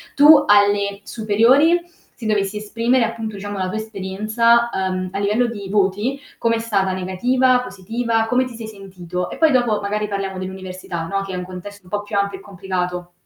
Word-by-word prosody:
tu 290 0 +8
alle 205 -1 +3
superiori 240 +11 +3 0.4
se 225 - -7
dovessi 210 -1 0
esprimere, 230 +3 +1
appunto, 220 -2 -5
diciamo, 205 0 -6
la 185 -1 -1
tua 220 - -3
esperienza, 220 +3 +1
uhm, 185 -1 -2
a 195 - -2
livello 210 +5 +2
di 205 -4 -6
voti 205 +7 0 0.2
com'è 230 -1 +1
stata 200 -4 0
negativa, 250 +8 +2
positiva, 225 +3 -2
come 250 +3 +2
ti 245 -2 -9
sei 225 -1 -7
sentito? 185 -4 -6
E - - -7
poi 320 -2 +4
dopo 240 -5 +2
magari 210 +1 -2
parliamo 195 -1 -3
dell'università, 185 -3 -6
no, 195 +1 -1
che 195 -1 -6
è - - -3
un 180 - -4
contesto 185 +2 -9
un 180 - -18
po' 205 +1 -2
più 205 - -3
ampio 200 -1 -1
e - - -15
complicato. 180 -2 -4
205 Hz, 185 wpm, -20 LUFS, 190-230 Hz, 0.4 s, tu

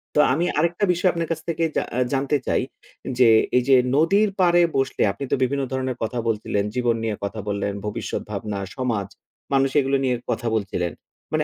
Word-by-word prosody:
তো - - +4
আমি 170 +5 +1
আরেকটা 170 +5 +1
বিষয় 185 +2 +2
আপনার 170 -1 -3
কাছ 160 - -1
থেকে 165 0 -1
জা - - +1
আ - - +2
জানতে 140 +2 +1
চাই। - - +2 0.6
যে, 125 -3 +6 0.3
এই 125 - +3
যে 135 - +8 0.2
নদীর 200 +7 +4
পাড়ে 175 -1 +5 0.2
বসলে 135 -1 -1
আপনি 140 - -7
তো - - +4
বিভিন্ন 140 +2 0
ধরনের 130 -1 -2
কথা 120 +2 -2
বলছিলেন, 105 -2 0
জীবন 120 -2 +1
নিয়ে 110 -2 -1
কথা 105 +2 -4
বললেন, 100 0 -1
ভবিষ্যৎ 105 - -3
ভাবনা, 100 0 -4 0.2
সমাজ, 115 -7 -1 0.5
মানুষ 135 0 +3
এগুলো 135 0 +1
নিয়ে 125 -1 +1 0.2
কথা 120 - -2
বলছিলেন। 90 -5 -2 0.4
মানে - - +2
130 Hz, 190 wpm, -23 LUFS, 110-155 Hz, 0.6 s, যে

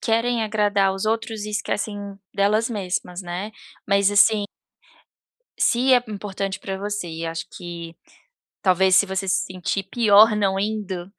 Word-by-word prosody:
querem 230 +1 +1
agradar 205 -3 +1
os 195 - -4
outros 220 -1 -2
e 210 - -5
esquecem 205 -1 -3 0.2
delas 210 +4 +1
mesmas, 180 -3 -3
né, 180 +3 -5 0.4
mas 200 0 +3
assim 205 +1 +4 1.1
se 255 +2 +3
é 245 - +4
importante 195 -1 -4
pra 195 -1 -4
você 205 -2 -4
e 165 0 -5
acho 165 0 -4
que 170 -2 -8 0.7
talvez 185 0 +4
se 195 - +5
você 190 0 -3
se 185 - +1
sentir 185 +1 -3
pior 215 +1 +5
não 195 -2 +1
indo 195 -3 -3
200 Hz, 145 wpm, -22 LUFS, 190-215 Hz, 1.1 s, se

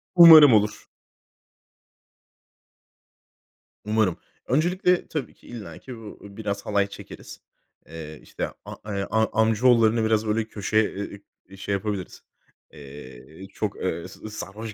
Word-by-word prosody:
Umarım 160 -6 +10
olur. 105 0 +1 3.0
Umarım. 105 -4 0 0.3
Öncelikle 175 +5 +1
tabii 150 -4 -5
ki - - -22
illaki 115 +2 -10
bu 110 -2 -11
biraz 100 0 -6
halay 100 -1 +1
çekeriz. 100 - -12 0.5
Eee, 80 -1 -9
işte, - - -5 0.2
a - - -8 0.2
eee, 100 0 -3
a 110 +1 +1
amcaoğullarını 115 0 +3
biraz, 110 0 +1
böyle, 110 +1 0
köşe, 110 0 -1 0.7
eee, 95 - -13
şey 100 - -4
yapabiliriz. 100 -1 -4 0.5
Eee, 70 +4 -12
çok, 105 -2 -3
eee, 85 -1 -3
s 110 +3 -11
sarhoş 105 +1 -8
105 Hz, 115 wpm, -24 LUFS, 95-115 Hz, 3.0 s, Umarım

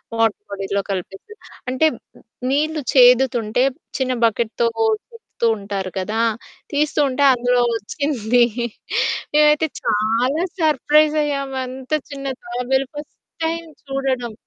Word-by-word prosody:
Water 225 -2 +1
బాడీలో 200 0 -2
కలిపేసాం. 195 - -6 0.3
అంటే, 260 +5 +3 0.6
నీళ్ళు 305 +2 0
చేదుతుంటే 245 -2 +5 0.4
చిన్న 255 -1 0
బకెట్‌‌తో 230 +1 0 0.4
తిప్పుతూ 450 - -3
ఉంటారు 200 -2 -4
కదా! 215 +4 -1 0.5
తీస్తుంటే 285 -2 +1
అందులో 245 0 +2
వొచ్చింది. 240 +1 +1 0.9
మేమైతే 300 +1 +4
చాలా 230 - +1 0.2
సర్ప్రైజ్ 305 0 +3
అయ్యాము. 275 -2 -3
అంత 260 +3 -9 0.2
చిన్న 275 -1 -6 0.2
తాబేలు 250 +3 -1
ఫర్స్ట్ 295 0 -8 0.3
టైమ్ 335 +1 -2 0.2
చూడడం. 265 -4 -2
255 Hz, 100 wpm, -20 LUFS, 225-295 Hz, 0.9 s, చేదుతుంటే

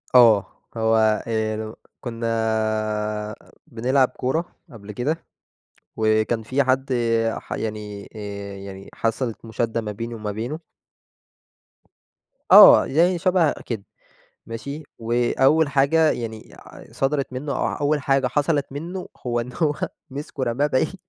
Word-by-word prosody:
آه، 115 -5 +7 0.3
هو 110 -1 +3
هي 110 -1 -1
لو 110 0 -6 0.3
كنّا 115 -1 -5 1.4
بنلعب 130 +1 +2
كورة 160 +7 -3 0.2
قبل 105 -2 -10
كده، 150 +10 -2 0.7
وكان 110 +1 +1
في 130 +5 +1
حد 130 +1 +1 0.5
ح - - -21
يعني 105 -2 -5
آآ 100 -1 -6
يعني 95 0 -9
حصلت 115 0 -2
مشادّة 115 +1 -2
ما 105 - -4
بيني 115 +3 -6
وما 105 -1 -4
بينه 120 +9 -4 1.9
آه - - +10
يعني 170 +4 +2
شبه 180 -4 +3
كده. 110 -5 -4 0.6
ماشي، 140 +7 -6 0.2
وأول 125 +6 +2
حاجة 145 +3 +3
يعني 110 -2 -5
ع - - -13
صدرت 135 -1 -1
منه، 140 +3 -4
أو - - 0
أول 145 +1 0
حاجة 135 -2 +2
حصلت 145 +2 +1
منه، 170 +6 -6 0.2
هو 120 -1 0
إن 120 +2 -6
هو 155 -3 +1 0.4
مسكه 140 0 -6
رماه 125 +4 +1
بعيد، 145 +5 0
120 Hz, 125 wpm, -23 LUFS, 110-145 Hz, 1.9 s, آه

